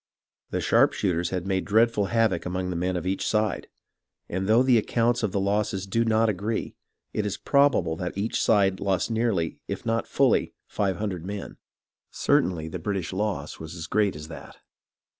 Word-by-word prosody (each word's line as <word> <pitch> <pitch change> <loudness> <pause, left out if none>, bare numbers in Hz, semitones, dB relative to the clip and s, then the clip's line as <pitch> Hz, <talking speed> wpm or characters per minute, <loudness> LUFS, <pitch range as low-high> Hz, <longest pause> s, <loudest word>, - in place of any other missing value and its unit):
The - - -2
sharpshooters 90 -3 +2
had 90 -1 -3
made 95 -1 0
dreadful 110 0 +3
havoc 110 -5 +1
among 90 +1 -3
the - - -3
men 90 +2 -1
of 90 -1 -3
each 95 +1 -1
side, 110 -1 0 0.6
and 95 +2 -3
though 115 +4 +5
the 125 -3 +5
accounts 120 +2 +1
of 110 -4 0
the 100 - 0
losses 100 0 0
do 115 +4 +1
not 115 0 +3
agree, 105 +2 -2 0.4
it 105 - 0
is 105 -1 -3
probable 140 - +2
that 90 +2 -4
each 105 +3 -1
side 100 -3 +3
lost 95 +1 0
nearly, 110 -8 0
if - - -5
not 115 -1 0
fully, - - +2
five 95 -3 -1
hundred 95 -5 -3
men. 100 +2 -6 0.5
Certainly 80 -3 +1
the - - -5
British 95 -5 -3
loss 105 +1 -3
was 80 +1 -8
as 80 -1 -6
great 100 0 +1
as 75 0 -8
that. 80 - -11
100 Hz, 180 wpm, -26 LUFS, 90-110 Hz, 0.6 s, though